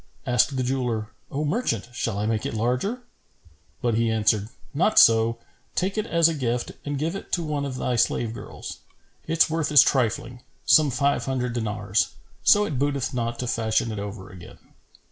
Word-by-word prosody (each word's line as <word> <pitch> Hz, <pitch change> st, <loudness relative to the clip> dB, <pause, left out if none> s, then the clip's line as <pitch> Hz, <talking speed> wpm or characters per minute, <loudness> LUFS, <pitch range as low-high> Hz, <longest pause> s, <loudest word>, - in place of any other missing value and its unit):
Asked 125 Hz, +3 st, +2 dB
the 130 Hz, -, 0 dB
jeweller, 125 Hz, -4 st, -1 dB, 0.2 s
"O 145 Hz, +3 st, -2 dB
merchant, 145 Hz, -, -1 dB
shall 115 Hz, -3 st, -2 dB
I 105 Hz, -, -1 dB
make 110 Hz, -1 st, 0 dB
it -, -, -3 dB
larger?" 125 Hz, -, -1 dB, 0.8 s
But 120 Hz, -1 st, +2 dB
he 115 Hz, +1 st, +1 dB
answered, 110 Hz, -1 st, +1 dB, 0.2 s
"Not 180 Hz, +9 st, +1 dB
so; 115 Hz, 0 st, +6 dB, 0.4 s
take 190 Hz, +2 st, 0 dB
it 215 Hz, -, -2 dB
as 170 Hz, -1 st, +4 dB
a 165 Hz, -, 0 dB
gift 125 Hz, -4 st, -2 dB
and 145 Hz, -1 st, -3 dB
give 160 Hz, +6 st, -2 dB
it 195 Hz, -, -8 dB
to 175 Hz, -, +1 dB
one 150 Hz, -2 st, -2 dB
of 135 Hz, -2 st, -4 dB
thy 125 Hz, -1 st, -1 dB
slave 115 Hz, 0 st, +1 dB
girls. -, -, -8 dB, 0.5 s
Its 165 Hz, +1 st, +3 dB
worth 160 Hz, -2 st, -1 dB
is 145 Hz, -4 st, +9 dB
trifling, 125 Hz, -1 st, 0 dB, 0.2 s
some 155 Hz, -2 st, +5 dB
five 140 Hz, +2 st, 0 dB
hundred 125 Hz, -2 st, -2 dB
dinars; 105 Hz, -4 st, -1 dB, 0.3 s
so 210 Hz, 0 st, +5 dB
it 145 Hz, -10 st, -3 dB
booteth 140 Hz, -1 st, -1 dB
not 120 Hz, -1 st, -2 dB
to 125 Hz, -, -3 dB
fashion 115 Hz, -1 st, 0 dB
it 105 Hz, -, -4 dB
over 100 Hz, -1 st, -7 dB
again." 90 Hz, -1 st, -12 dB
125 Hz, 185 wpm, -24 LUFS, 110-145 Hz, 0.8 s, is